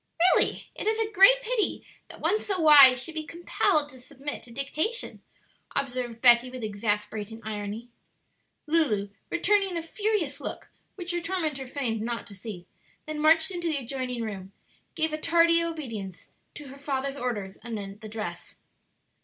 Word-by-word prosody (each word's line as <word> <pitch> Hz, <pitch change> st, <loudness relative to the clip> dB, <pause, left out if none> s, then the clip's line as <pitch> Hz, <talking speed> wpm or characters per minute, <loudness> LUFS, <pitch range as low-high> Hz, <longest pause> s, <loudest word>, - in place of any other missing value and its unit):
"Really, -, -, +1 dB
it -, -, -5 dB
is 440 Hz, 0 st, +2 dB
a 445 Hz, -1 st, -1 dB
great -, -, +6 dB
pity 465 Hz, -3 st, -1 dB, 0.2 s
that -, -, -12 dB
one 430 Hz, -, +1 dB
so 395 Hz, -4 st, -2 dB
wise 280 Hz, -5 st, +8 dB
should 330 Hz, -, -7 dB
be 315 Hz, -1 st, -3 dB
compelled 310 Hz, -2 st, 0 dB
to 260 Hz, -2 st, -12 dB
submit 280 Hz, +3 st, -6 dB
to 240 Hz, -, -13 dB
dictation," 305 Hz, -, -2 dB, 0.5 s
observed 250 Hz, -4 st, -3 dB
Betty 240 Hz, 0 st, +6 dB
with 255 Hz, -2 st, -8 dB
exasperating 210 Hz, +1 st, -3 dB
irony. 210 Hz, +2 st, -5 dB, 0.8 s
Lulu, 265 Hz, -11 st, +2 dB, 0.2 s
returning 390 Hz, 0 st, +2 dB
a 330 Hz, -, -3 dB
furious 335 Hz, -6 st, -1 dB
look, -, -, -6 dB, 0.3 s
which 360 Hz, -2 st, -5 dB
her 345 Hz, 0 st, -2 dB
tormentor 320 Hz, -7 st, -2 dB
feigned 245 Hz, -5 st, -2 dB
not 235 Hz, +1 st, -3 dB
to 205 Hz, -, -11 dB
see, 190 Hz, -2 st, -8 dB, 0.4 s
then 310 Hz, -1 st, -5 dB
marching 320 Hz, +4 st, +4 dB
into 345 Hz, -1 st, -3 dB
the 310 Hz, -3 st, 0 dB
adjoining 255 Hz, -2 st, -3 dB
room, 195 Hz, -3 st, -6 dB, 0.4 s
gave 320 Hz, -1 st, +1 dB
tardy 335 Hz, 0 st, +4 dB
obedience 230 Hz, -, -6 dB, 0.3 s
to 295 Hz, -2 st, -9 dB
her 275 Hz, +1 st, -12 dB
father's 275 Hz, -1 st, -2 dB
orders 210 Hz, -7 st, -4 dB
anent 210 Hz, -3 st, -7 dB
the 215 Hz, -, -8 dB
dress. 215 Hz, 0 st, -6 dB
275 Hz, 155 wpm, -27 LUFS, 225-335 Hz, 0.8 s, wise